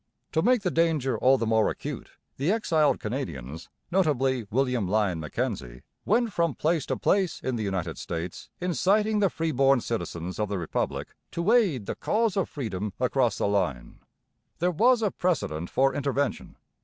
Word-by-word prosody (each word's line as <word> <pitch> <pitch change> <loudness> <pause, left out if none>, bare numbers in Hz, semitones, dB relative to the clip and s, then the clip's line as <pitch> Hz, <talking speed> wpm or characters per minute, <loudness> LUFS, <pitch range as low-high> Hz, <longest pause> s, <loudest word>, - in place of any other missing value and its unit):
To 160 - +2
make 245 +2 +3
the 180 - 0
danger 155 -7 +1
all 130 +4 +4
the 115 - -1
more 110 -1 +3
acute, - - -6 0.3
the 145 +7 +1
exiled 160 -9 +2
Canadians, 80 - -5 0.2
notably 135 - +1
William 125 -4 +1
Lyon 100 -4 +1
Mackenzie, 75 - -4 0.2
went 225 0 +2
from 170 -4 +1
place 160 -2 0
to - - -1
place 190 -4 +1
in 130 - -2
the 115 - -3
United 95 -5 -3
States 85 +1 -5
inciting 205 +4 +2
the 200 -2 +3
freeborn 135 -5 +2
citizens 90 -7 -4
of 105 -1 0
the 100 - -1
Republic 85 -3 -2 0.2
to 170 +5 0
aid 185 - +3
the - - -3
cause 225 -2 0
of 195 - 0
freedom 105 -7 -4
across 125 -3 +1
the - - 0
line. 90 -12 -1 0.6
There 180 +2 +1
was 235 +7 +4 0.2
precedent 90 - -1
for 135 +1 +2
intervention. 140 0 -2
135 Hz, 160 wpm, -27 LUFS, 100-170 Hz, 0.6 s, all